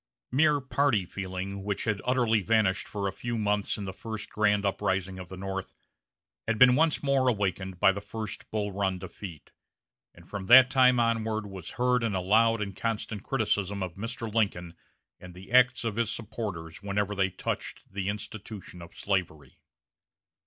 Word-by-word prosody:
Mere 150 +3 +4
party 130 -6 +1
feeling, 95 +1 -5
which 100 -1 -2
had 110 -2 -1
utterly 120 -4 +2
vanished 105 -2 +2
for 100 -1 -3
a - - -1
few 120 +4 -4
months 105 -1 0
in 105 - -5
the 95 -1 -5
first 110 +1 -6
grand 105 -1 +2
uprising 95 -1 -1
of 90 -1 -9
the 95 - -8
North, 95 0 -5 0.7
had 115 -1 +1
been 125 +2 +8
once 160 +1 +2
more 135 -2 +2
awakened 95 -5 -1
by 95 - +6
the 100 +1 -5
first 105 0 -7
Bull 105 -1 -2
Run 95 -1 -1
defeat, 90 -3 -9 0.6
and 85 0 -17
from 100 -2 -6
that 125 +2 +9
time 125 -2 +5
onward 110 -2 0
was 95 -4 -8
heard 125 0 +2
in 115 -2 0
loud 105 +4 +3
and 100 -2 -7
constant 110 -1 -3
criticism 100 -5 -1
of 90 -2 -5
Mr. 115 +5 -5
Lincoln 90 -6 0 0.5
and 90 -1 -12
the 95 +4 -12
acts 125 0 +5
of 115 -2 -2
his 115 -2 +1
supporters 100 -8 -6
wherever 100 0 -1
they 95 -1 +1
touched 95 - -5
the 100 -1 -2
institution 105 -3 -7
of 85 - -13
slavery. 90 -7 -2
105 Hz, 170 wpm, -28 LUFS, 95-115 Hz, 0.7 s, that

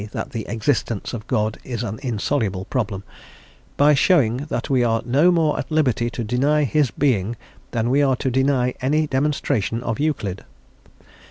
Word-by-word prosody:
that - - -4
the 115 - -5
existence 115 -2 -1
of 110 -3 -6
God 110 -3 -1
is 120 -3 -4
an 110 0 -4
insoluble 110 -5 -1
problem), 100 -6 -2 0.7
"by 145 +1 +5
showing 140 - +2
that - - -2
we 130 -3 +2
are 115 -1 +1
no 140 +8 +4
more 160 -3 +2
at - - -5
liberty 125 -7 +1
to 120 0 -5
deny 140 +7 +2
His 145 0 +2
being, 120 -6 0 0.3
than 115 0 -1
we 140 +2 +3
are 135 -2 +3
to 130 +1 -2
deny 130 -1 +1
any 150 +4 +2
demonstration 130 -6 -1
of 115 +1 -3
Euclid. 120 -11 -2
125 Hz, 165 wpm, -22 LUFS, 115-145 Hz, 0.7 s, by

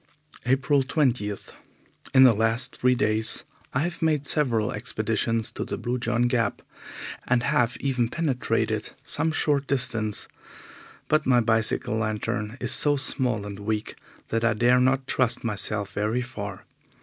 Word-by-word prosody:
April 135 +2 +3
20. 130 -6 0 0.8
In 130 - +9
the 125 -3 +7
last 115 +3 0
three 125 0 +3
days 110 -1 +1 0.3
I 130 - 0
have 170 +2 -3
made 155 -3 +1
several 120 -9 +1
expeditions 115 -1 -1
to - - -4
the - - -4
Blue 125 +1 -2
John 120 0 0
Gap, 120 -1 0 0.6
and 120 -1 +2
have 125 -3 +1
even 125 -4 0
penetrated 115 -8 -1
some 160 +2 -1
short 145 -3 +1
distance, 120 -6 +1 0.8
but 155 -1 +1
my 125 -2 +5
bicycle 110 -1 +1
lantern 110 +1 -2
is - - -1
so 145 -1 +3
small 125 -6 0
and 100 -1 -7
weak 105 +1 -3 0.4
that 115 0 -1
I 115 -1 +2
dare 120 +3 +4
not 130 +1 +2
trust 125 -2 0
myself 105 -2 -1
very 110 +4 -1
far. 100 -6 -7
120 Hz, 145 wpm, -25 LUFS, 110-135 Hz, 0.8 s, In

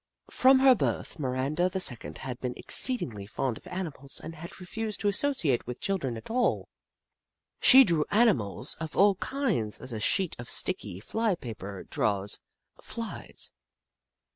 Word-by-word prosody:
From 260 +1 +5
her 265 0 +7
birth, 205 - -2
Miranda 140 +6 0
the 190 - -3
Second 125 -10 +1
had 125 -2 -6
been 125 -1 -4
exceedingly 115 - +1
fond 120 +2 -2
of - - -16
animals 150 -7 -5
and 165 - -8
had 165 +2 -10
refused 215 +4 -4
to 205 - 0
associate 200 - +1
with 125 - -6
children 140 -12 -2
at 110 - -9
all. 245 +1 0 0.9
She 265 +1 +9
drew 165 -8 +1
animals 140 - +1
of 160 -2 -6
all 200 +1 +6
kinds 210 - -1
as 130 - -7
a 110 - -3
sheet 180 - +2
of 120 - -7
sticky 90 - -2
fly 220 - 0
paper 100 - -8
draws 100 -1 -1 0.4
Flies. 230 -1 -6
160 Hz, 150 wpm, -28 LUFS, -, 0.9 s, She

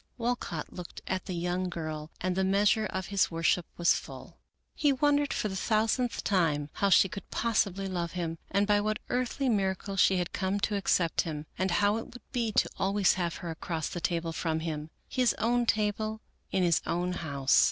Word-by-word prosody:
Walcott 235 -10 -3
looked 180 -2 -9
at 190 -1 -2
the 185 - -3
young 180 +2 -1
girl 155 -3 -5
and 185 0 0
the 190 - +1
measure 205 +3 +3
of 190 -1 -4
his 200 - +3
worship 165 +1 +1
was 170 0 +4
full. - - -8 0.3
He 290 - +2
wondered 290 +1 +2
for - - 0
the 190 - -4
thousandth 225 +4 +1
time 155 -7 +1
how 200 - +1
she 195 - +6
could 195 +2 -8
possibly 200 -4 0
love 175 -3 -3
him 165 -2 -3
and 200 +1 +2
by 205 0 +3
what 215 +1 0
earthly 255 +2 0
miracle 195 -3 0
she 190 0 +5
had 180 -1 -2
come 190 +1 0
to 210 - +1
accept 180 -4 +2
him, 155 -2 -5
and 185 +1 0
how 205 +4 +3
it 225 - -4
would 245 - -14
be 235 -4 0 0.3
always 195 0 +3
to - - -2
have 170 -2 -1
her 170 - -2
across 160 0 -3
the 175 - -5
table 165 -1 -1
from 160 -1 -1
him, 155 -2 -4 0.2
his 250 -2 +2
own 240 +1 +1
table 215 +1 0 0.3
in 190 - +2
his 170 -2 +3
own 180 +1 0
house. 140 -6 +2
190 Hz, 195 wpm, -29 LUFS, 170-215 Hz, 0.3 s, she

